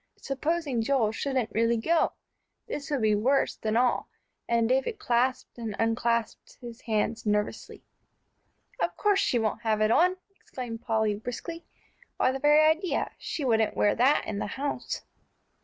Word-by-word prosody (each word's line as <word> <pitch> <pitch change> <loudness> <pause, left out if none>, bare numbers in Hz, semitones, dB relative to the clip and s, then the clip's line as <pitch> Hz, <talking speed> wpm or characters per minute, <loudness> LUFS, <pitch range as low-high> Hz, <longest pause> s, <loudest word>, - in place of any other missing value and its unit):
Supposing 285 -2 -1
Joel 225 -3 +2
shouldn't 255 -1 -2
really 230 +1 +2
go! 325 +8 +1 0.5
This 285 - -5
would 280 -6 -1
be 215 -1 +4
worse 250 +7 +2
than 220 0 -1
all, 245 0 +2 0.4
and 230 -1 +2
David 265 - 0
clasped 250 - 0
and 220 -3 -4
unclasped 230 0 -1
his 235 -1 -10
hands 225 0 -1
nervously. 210 -1 -2 1.0
"Of - - -1
course 410 -2 +3
she 250 - +2
won't 220 0 -1
have 220 -2 +1
it 215 +1 +3
on!" 365 +7 +4 0.2
exclaimed 240 -9 -7
Polly, 220 -2 +1
briskly. 245 +10 -6 0.5
"Why, 255 - +3
the 270 - -4
very 295 +2 +5
idea, 320 +3 0
she 295 - -4
wouldn't 220 -3 +2
wear 205 - +3
that 260 +5 +3
in 205 -2 -4
the - - -2
house!" 275 +7 -4
240 Hz, 155 wpm, -28 LUFS, 225-280 Hz, 1.0 s, very